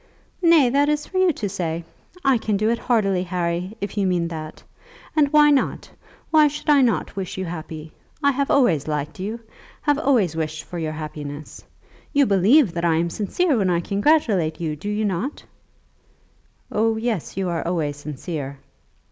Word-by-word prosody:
"Nay; 335 Hz, -6 st, +6 dB
that 285 Hz, +3 st, +2 dB
is 300 Hz, 0 st, 0 dB
for 375 Hz, -, -2 dB
you 370 Hz, -1 st, +4 dB
to 215 Hz, -, -3 dB
say. 170 Hz, -4 st, -3 dB, 0.4 s
I 270 Hz, -3 st, +4 dB
can 215 Hz, -2 st, 0 dB
do 215 Hz, +3 st, +1 dB
it 235 Hz, -, -1 dB
heartily, 195 Hz, -6 st, +1 dB
Harry, 180 Hz, +2 st, -2 dB
if 200 Hz, -, -4 dB
you 195 Hz, -, +2 dB
mean 175 Hz, -2 st, 0 dB
that. 155 Hz, -2 st, -7 dB, 0.5 s
And 290 Hz, -3 st, +3 dB
why 300 Hz, -1 st, +6 dB
not? 280 Hz, -, 0 dB, 0.4 s
Why 310 Hz, -1 st, +6 dB
should 300 Hz, +1 st, -1 dB
I 285 Hz, -2 st, +6 dB
not 235 Hz, -5 st, 0 dB
wish 190 Hz, -2 st, -5 dB
you 190 Hz, -, -2 dB
happy? 160 Hz, -2 st, -7 dB, 0.3 s
I 280 Hz, -, +5 dB
have 280 Hz, +1 st, -1 dB
always 175 Hz, -, +3 dB
liked 150 Hz, 0 st, -3 dB
you, 215 Hz, +5 st, -4 dB, 0.4 s
have 290 Hz, -1 st, +2 dB
always 235 Hz, -, +2 dB
wished 155 Hz, -1 st, -3 dB
for 175 Hz, -, -7 dB
your 155 Hz, -1 st, -3 dB
happiness. 150 Hz, -1 st, -7 dB, 0.5 s
You 285 Hz, -1 st, +4 dB
believe 210 Hz, -, +4 dB
that 170 Hz, 0 st, -3 dB
I 170 Hz, -2 st, +3 dB
am 170 Hz, +1 st, 0 dB
sincere 285 Hz, -, 0 dB
when 195 Hz, -5 st, +1 dB
I 175 Hz, -1 st, +2 dB
congratulate 200 Hz, -, +1 dB
you; 160 Hz, -3 st, -2 dB
do 180 Hz, +8 st, -6 dB
you 210 Hz, +1 st, -1 dB
not?" 205 Hz, -, -3 dB, 1.3 s
"Oh, 220 Hz, +1 st, +1 dB
yes; 220 Hz, -7 st, -3 dB
you 190 Hz, -2 st, -1 dB
are 170 Hz, -2 st, -1 dB
always 160 Hz, -4 st, -1 dB
sincere." 145 Hz, -1 st, -6 dB
195 Hz, 180 wpm, -22 LUFS, 165-260 Hz, 1.3 s, Nay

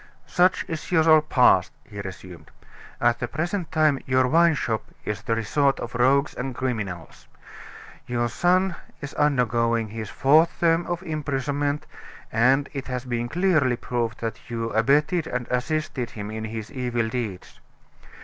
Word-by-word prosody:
"Such 180 Hz, +1 st, +2 dB
is 160 Hz, +2 st, -6 dB
your 160 Hz, -2 st, +6 dB
past," 125 Hz, -11 st, +4 dB
he 100 Hz, -1 st, -8 dB
resumed. 95 Hz, -2 st, -10 dB, 0.5 s
"At 120 Hz, 0 st, +2 dB
the 120 Hz, -, -2 dB
present 170 Hz, -, -3 dB
time 155 Hz, -3 st, +3 dB
your 130 Hz, 0 st, +3 dB
wine 165 Hz, +3 st, +4 dB
shop 110 Hz, -5 st, -2 dB, 0.2 s
is 105 Hz, -1 st, -3 dB
the 115 Hz, +1 st, -1 dB
resort 135 Hz, +5 st, +1 dB
of 120 Hz, -, -6 dB
rogues 135 Hz, +4 st, +3 dB
and 130 Hz, 0 st, -5 dB
criminals. 105 Hz, -10 st, -4 dB, 0.8 s
Your 120 Hz, -1 st, 0 dB
son 180 Hz, +8 st, +2 dB, 0.3 s
is 145 Hz, -1 st, -7 dB
undergoing 115 Hz, -5 st, +1 dB
his 110 Hz, 0 st, -6 dB
fourth 155 Hz, +5 st, +3 dB
term 165 Hz, 0 st, +2 dB
of 175 Hz, +1 st, -3 dB
imprisonment; 145 Hz, -2 st, -2 dB, 0.5 s
and 130 Hz, +5 st, +3 dB
it 140 Hz, -2 st, -5 dB
has 125 Hz, -1 st, -4 dB
been 120 Hz, -1 st, -2 dB
clearly 160 Hz, -8 st, +2 dB
proved 120 Hz, -1 st, -3 dB
that 115 Hz, +1 st, -5 dB
you 115 Hz, -1 st, -3 dB
abetted 145 Hz, -, +2 dB
and 125 Hz, -1 st, -3 dB
assisted 125 Hz, -1 st, -1 dB
him 105 Hz, -1 st, -7 dB
in 110 Hz, 0 st, -4 dB
his 110 Hz, 0 st, -6 dB
evil 120 Hz, -4 st, -1 dB
deeds. 110 Hz, -5 st, -5 dB
125 Hz, 150 wpm, -24 LUFS, 115-150 Hz, 0.8 s, your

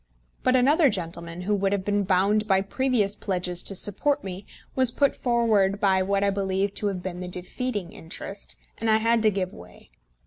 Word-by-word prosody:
But 255 Hz, -, +3 dB
another 285 Hz, +4 st, +5 dB
gentleman, 170 Hz, -3 st, -4 dB
who 205 Hz, +3 st, 0 dB
would 195 Hz, -1 st, +1 dB
have 195 Hz, -2 st, -2 dB
been 205 Hz, -1 st, +1 dB
bound 200 Hz, +3 st, +2 dB
by 190 Hz, -2 st, +3 dB
previous 210 Hz, -1 st, 0 dB
pledges 180 Hz, -2 st, -2 dB
to 195 Hz, -, -1 dB
support 280 Hz, +10 st, 0 dB
me, 190 Hz, +1 st, -7 dB, 0.3 s
was 260 Hz, -2 st, +4 dB
put 280 Hz, +3 st, +1 dB
forward 220 Hz, -5 st, +2 dB
by 190 Hz, -3 st, +3 dB
what 195 Hz, +1 st, +1 dB
I 200 Hz, -, +3 dB
believe 195 Hz, 0 st, -1 dB
to 210 Hz, -, -2 dB
have 185 Hz, -3 st, -3 dB
been 180 Hz, -1 st, -5 dB
the 180 Hz, -, -5 dB
defeating 185 Hz, +2 st, -4 dB
interest, 190 Hz, +4 st, -6 dB, 0.2 s
and 225 Hz, -, 0 dB
I 220 Hz, -, +5 dB
had 230 Hz, +1 st, +2 dB
to 215 Hz, -, +5 dB
give 190 Hz, -2 st, -2 dB
way. 90 Hz, -6 st, -15 dB
200 Hz, 195 wpm, -25 LUFS, 185-220 Hz, 0.3 s, another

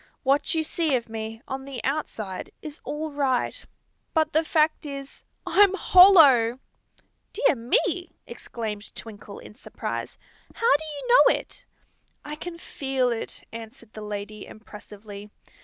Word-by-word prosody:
"What 275 Hz, +4 st, +2 dB
you 320 Hz, -, +1 dB
see 315 Hz, -2 st, 0 dB
of 235 Hz, -2 st, -3 dB
me, 225 Hz, +1 st, -6 dB
on 265 Hz, 0 st, -5 dB
the 270 Hz, -2 st, -7 dB
outside, 225 Hz, -9 st, -3 dB
is 305 Hz, -1 st, -8 dB
all 305 Hz, +1 st, -4 dB
right; 270 Hz, -4 st, -1 dB, 0.5 s
but 315 Hz, -1 st, +2 dB
the 315 Hz, +2 st, +3 dB
fact 310 Hz, 0 st, +1 dB
is, 275 Hz, -2 st, -8 dB, 0.2 s
I'm 395 Hz, -1 st, +5 dB
hollow!" 310 Hz, -13 st, +7 dB, 0.8 s
"Dear -, -, +3 dB
me!" 355 Hz, -, 0 dB, 0.2 s
exclaimed 215 Hz, -3 st, -7 dB
Twinkle, 210 Hz, -2 st, -9 dB
in -, -, -12 dB
surprise. -, -, -6 dB, 0.4 s
"How 460 Hz, -10 st, +4 dB
do 315 Hz, +2 st, -2 dB
you 305 Hz, +9 st, -7 dB, 0.2 s
know -, -, +5 dB
it?" -, -, -13 dB, 0.6 s
"I 300 Hz, 0 st, -5 dB
can 335 Hz, +2 st, -7 dB
feel 265 Hz, -6 st, -1 dB
it," 230 Hz, -, -5 dB
answered 230 Hz, 0 st, -11 dB
the 215 Hz, -, -8 dB
lady, 210 Hz, 0 st, -6 dB
impressively. 210 Hz, -1 st, -11 dB
270 Hz, 140 wpm, -25 LUFS, 225-315 Hz, 0.8 s, hollow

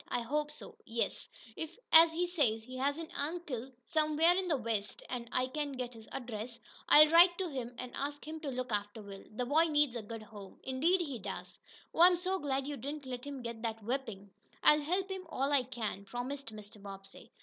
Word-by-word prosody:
"I 245 Hz, -, -1 dB
hope 295 Hz, +5 st, -1 dB
so, 445 Hz, +9 st, -11 dB
yes. 230 Hz, 0 st, -2 dB, 0.3 s
If, 320 Hz, +4 st, -6 dB
as 325 Hz, 0 st, +9 dB
he 345 Hz, +2 st, 0 dB
says, 275 Hz, -11 st, +1 dB
he 255 Hz, +3 st, -9 dB
has 280 Hz, +3 st, +1 dB
an 330 Hz, -1 st, -6 dB
uncle 285 Hz, -5 st, -3 dB
somewhere 315 Hz, +2 st, +3 dB
in 375 Hz, 0 st, 0 dB
the 315 Hz, -5 st, +2 dB
West, 220 Hz, -4 st, -3 dB
and 240 Hz, -2 st, -4 dB
I 255 Hz, -, +2 dB
can 290 Hz, +2 st, -3 dB
get 250 Hz, -1 st, -4 dB
his 225 Hz, -1 st, -13 dB
address, 235 Hz, -2 st, -5 dB, 0.3 s
I'll 305 Hz, +1 st, +10 dB
write 345 Hz, +1 st, +7 dB
to 375 Hz, -, -1 dB
him, 245 Hz, -4 st, -5 dB
and 250 Hz, -1 st, -6 dB
ask 290 Hz, +1 st, -4 dB
him 315 Hz, +1 st, -5 dB
to 305 Hz, -3 st, -4 dB
look 255 Hz, -1 st, -3 dB
after 205 Hz, +1 st, -2 dB
Will. 195 Hz, -1 st, -9 dB
The 245 Hz, +3 st, -3 dB
boy 305 Hz, +6 st, +4 dB
needs 295 Hz, -5 st, +2 dB
a 235 Hz, -, -2 dB
good 220 Hz, +1 st, -7 dB
home." 205 Hz, -2 st, -12 dB
"Indeed 320 Hz, +8 st, +2 dB
he 280 Hz, -8 st, -4 dB
does. 195 Hz, -1 st, -7 dB, 0.3 s
Oh, -, -, +1 dB
I'm 355 Hz, 0 st, +8 dB
so 375 Hz, +2 st, -1 dB
glad 275 Hz, -2 st, -1 dB
you 290 Hz, 0 st, -4 dB
didn't 280 Hz, +4 st, -5 dB
let 250 Hz, -1 st, -5 dB
him 280 Hz, -3 st, -6 dB
get 235 Hz, -1 st, -5 dB
that 225 Hz, -1 st, -3 dB
whipping!" 225 Hz, -5 st, -3 dB, 0.3 s
"I'll 300 Hz, 0 st, +7 dB
help 365 Hz, +6 st, 0 dB
him 375 Hz, -2 st, -5 dB
all 275 Hz, -2 st, 0 dB
I 285 Hz, -2 st, +5 dB
can," 230 Hz, -5 st, -4 dB
promised 245 Hz, +6 st, -5 dB
Mr. 210 Hz, -1 st, -11 dB
Bobbsey. 195 Hz, -1 st, -11 dB
265 Hz, 215 wpm, -33 LUFS, 230-310 Hz, 0.3 s, I'll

